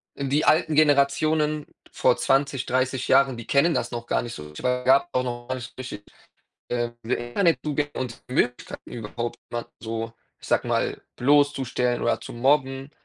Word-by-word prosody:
äh, 140 - -5
die 140 +3 +1
alten 155 -1 +3
Generationen 150 +1 +3 0.3
vor - - +3
20, 135 -1 +1
30 130 0 0
Jahren, 135 -1 +5
die 115 - -8
kennen 160 +4 +3
das 120 - -1
noch 120 0 -5
gar - - +1
nicht 120 -1 -6
so. 75 0 -9
Es - - -9
gab 130 +5 +3
auch 125 - +1
noch 120 -1 -5
gar 130 - 0
nicht 120 -2 -9
richtig, 125 -5 -7 0.7
äh, 120 -1 0
Internetzugänge 145 - 0
und 125 -3 -5
Möglichkeiten, 125 -1 -2
überhaupt 120 +1 -5
mal 120 0 -4
so, 115 0 -4 0.3
ich - - -10
sage - - +2
mal, - - 0
bloßzustellen 130 -3 +2
oder 120 - +1
zu - - -8
mobben. 135 +2 +1
130 Hz, 165 wpm, -25 LUFS, 120-145 Hz, 0.7 s, Jahren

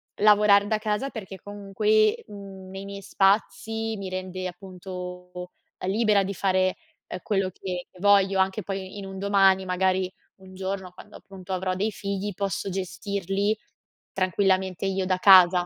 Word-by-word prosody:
lavorar 205 -1 +5
da 215 0 +1
casa 215 +4 -1
perché 195 -6 -8
comunque, 205 +2 +1
mhmm, 195 -2 -10
nei 195 +1 -7
miei 200 0 -7
spazi 220 +3 +1
mi 195 -2 -6
rende, 185 0 -5
appunto, 180 -1 -8 0.4
libera 210 0 +3
di 200 - -3
fare, 185 -1 +1 0.3
ehm, - - -6
quello 195 -3 0
che 180 -2 -5
voglio 195 0 +4
anche 190 +3 +1
poi 195 +1 -6
in 200 - -6
un 195 0 -8
domani, 195 -1 +4
magari, 185 0 0 0.3
un 190 0 -14
giorno 190 -1 -4
quando 180 - -14
appunto 190 -1 -9
avrò 185 0 -1
dei 210 +3 -1
figli, 200 0 -4
posso 195 +1 -3
gestirli 195 +2 -2 0.5
tranquillamente 190 0 +1
io 190 -1 0
da 185 0 +1
casa. 185 -2 +7
195 Hz, 145 wpm, -25 LUFS, 185-200 Hz, 0.5 s, casa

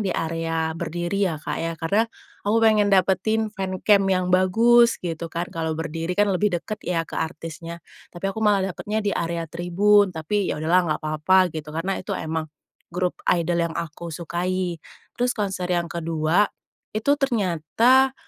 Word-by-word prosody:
di 195 -3 0
area 165 0 -1
berdiri 175 +4 -1
ya 160 - -3
Kak - - -3
ya, 165 0 -3
karena 200 +8 +1 0.4
aku 220 - +3
pengen 215 -2 +4
dapetin 200 +3 +2
fancamp 195 0 +2
yang 185 -1 +1
bagus 230 +6 +5
gitu 165 0 -3
kan, 170 +2 -3
kalau 160 -1 -2
berdiri 165 +2 -3
kan 205 -1 +3
lebih 185 -1 +1
dekat 215 +5 -6
ya 165 -2 -1
ke - - -5
artisnya. 165 +1 -6 0.2
Tapi 195 +3 -4
aku 220 - -6
malah 200 -3 +2
dapatnya 210 +3 -3
di 200 - +1
area 170 0 -2
tribun, 185 +5 +3
tapi 180 +4 -2
ya - - -1
udahlah 170 +3 +2
nggak - - -16
apa-apa 175 +4 +3
gitu 155 -1 -6
karena 165 +5 -2
itu - - -4
emang 160 0 -3 0.4
grup 180 +1 -2
idol 175 0 +2
yang 165 - -7
aku 170 0 -5
sukai. 175 +1 -2 0.4
Terus 245 0 +1
konser 195 -4 -2
yang 175 -1 -1
kedua 165 +3 +1 0.5
itu 280 +7 +2
ternyata 240 - +2
180 Hz, 165 wpm, -23 LUFS, 165-205 Hz, 0.5 s, bagus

